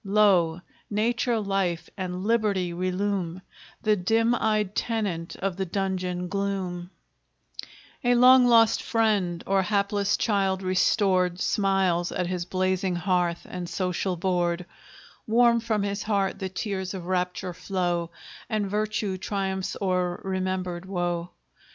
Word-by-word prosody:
Lo! 195 Hz, -5 st, +3 dB, 0.3 s
nature, 230 Hz, +2 st, +1 dB
life, 195 Hz, -5 st, -1 dB
and 185 Hz, -1 st, -4 dB
liberty 205 Hz, -6 st, +1 dB
relume 185 Hz, 0 st, -2 dB, 0.4 s
The 215 Hz, -1 st, +4 dB
dim 225 Hz, +6 st, +2 dB
eyed 215 Hz, -4 st, 0 dB
tenant 200 Hz, -8 st, -2 dB
of 190 Hz, -2 st, -3 dB
the 190 Hz, -, -1 dB
dungeon 180 Hz, -1 st, -2 dB
gloom; 190 Hz, -2 st, -3 dB, 1.1 s
A 245 Hz, 0 st, +4 dB
long 250 Hz, +1 st, +7 dB
lost 230 Hz, -2 st, +5 dB
friend, 205 Hz, -7 st, 0 dB
or 195 Hz, 0 st, +2 dB
hapless 200 Hz, 0 st, +1 dB
child 195 Hz, -3 st, +1 dB
restored, 185 Hz, -1 st, +2 dB
Smiles 190 Hz, -4 st, +1 dB
at 180 Hz, -, -1 dB
his 180 Hz, 0 st, -3 dB
blazing 185 Hz, 0 st, 0 dB
hearth 175 Hz, -1 st, 0 dB
and 180 Hz, -1 st, -6 dB
social 185 Hz, 0 st, -1 dB
board; 175 Hz, -1 st, 0 dB, 0.6 s
Warm 235 Hz, +1 st, +4 dB
from 220 Hz, -3 st, -1 dB
his 200 Hz, 0 st, -2 dB
heart 200 Hz, -3 st, 0 dB
the 190 Hz, -2 st, -3 dB
tears 190 Hz, -1 st, -3 dB
of 180 Hz, -2 st, -6 dB
rapture 180 Hz, 0 st, -2 dB
flow, 175 Hz, -2 st, -2 dB, 0.4 s
And 215 Hz, -3 st, 0 dB
virtue 210 Hz, -1 st, -1 dB
triumphs 190 Hz, -1 st, -2 dB
o'er 180 Hz, -2 st, 0 dB
remembered 185 Hz, -1 st, -3 dB
woe. 175 Hz, -2 st, -2 dB
190 Hz, 125 wpm, -26 LUFS, 180-205 Hz, 1.1 s, long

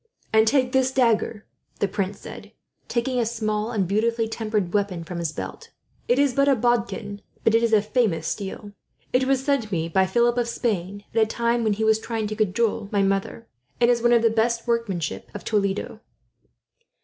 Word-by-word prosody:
"And 220 Hz, 0 st, +5 dB
take 255 Hz, 0 st, +2 dB
this 260 Hz, 0 st, +2 dB
dagger," 230 Hz, -4 st, +1 dB, 0.3 s
the 200 Hz, -, +1 dB
prince 200 Hz, 0 st, -3 dB
said, -, -, -10 dB, 0.3 s
taking 250 Hz, +1 st, -1 dB
a -, -, +2 dB
small 215 Hz, -1 st, -2 dB
and 205 Hz, -6 st, -1 dB
beautifully 225 Hz, +3 st, +1 dB
tempered 215 Hz, -5 st, -2 dB
weapon 200 Hz, -5 st, -1 dB
from 170 Hz, +1 st, -6 dB
his 165 Hz, -3 st, -2 dB
belt. -, -, -7 dB, 0.4 s
"It 245 Hz, -, +3 dB
is 280 Hz, -2 st, +3 dB
but 275 Hz, +2 st, +2 dB
a 275 Hz, -, +5 dB
bodkin, 230 Hz, -4 st, -1 dB, 0.2 s
but 225 Hz, -, +3 dB
it 225 Hz, -, +4 dB
is 230 Hz, -1 st, +1 dB
of 210 Hz, -1 st, +4 dB
famous 210 Hz, -9 st, +1 dB
steel. 205 Hz, 0 st, -5 dB, 0.4 s
It 255 Hz, +1 st, +3 dB
was 265 Hz, 0 st, +1 dB
sent 275 Hz, -7 st, 0 dB
me 165 Hz, -3 st, -1 dB
by 190 Hz, +3 st, +2 dB
Philip 240 Hz, +4 st, +2 dB
of 240 Hz, -, 0 dB
Spain, 205 Hz, -4 st, -2 dB
at 225 Hz, -, +3 dB
a 220 Hz, -, +4 dB
time 235 Hz, +1 st, 0 dB
when 215 Hz, -2 st, +2 dB
he 220 Hz, +2 st, -2 dB
was 220 Hz, 0 st, +3 dB
trying 225 Hz, -1 st, -3 dB
to 215 Hz, +1 st, -4 dB
cajole 215 Hz, 0 st, 0 dB
my 200 Hz, -1 st, +2 dB
mother, 195 Hz, +3 st, -1 dB, 0.3 s
and 240 Hz, 0 st, +5 dB
is 235 Hz, -1 st, 0 dB
of 240 Hz, -1 st, +4 dB
the 230 Hz, -, +4 dB
best 230 Hz, +1 st, 0 dB
workmanship 225 Hz, -9 st, -2 dB
of -, -, -6 dB
Toledo." 205 Hz, 0 st, -1 dB
220 Hz, 195 wpm, -24 LUFS, 205-235 Hz, 0.4 s, And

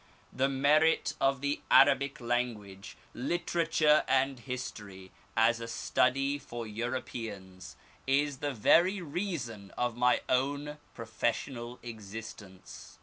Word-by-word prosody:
The 135 Hz, +1 st, +1 dB
merit 150 Hz, +4 st, +3 dB
of 135 Hz, -1 st, +2 dB
the 145 Hz, +1 st, -1 dB
Arabic 140 Hz, +1 st, +5 dB
language, 115 Hz, -5 st, -3 dB, 0.2 s
literature, 155 Hz, +1 st, +2 dB
and 135 Hz, -1 st, +1 dB
history, 105 Hz, -7 st, -7 dB, 0.3 s
as 115 Hz, +1 st, +4 dB
a 115 Hz, -, -6 dB
study 135 Hz, +4 st, +1 dB
for 120 Hz, -4 st, -7 dB
Europeans, 110 Hz, -5 st, -6 dB, 0.3 s
is 140 Hz, 0 st, +1 dB
the 145 Hz, -, -1 dB
very 175 Hz, -, +4 dB
reason 145 Hz, -, -4 dB
of 120 Hz, -2 st, -1 dB
my 125 Hz, +1 st, +3 dB
own 145 Hz, +3 st, -1 dB, 0.2 s
professorial 120 Hz, +2 st, -3 dB
existence. 110 Hz, -4 st, -10 dB
125 Hz, 105 wpm, -30 LUFS, 115-140 Hz, 0.3 s, Arabic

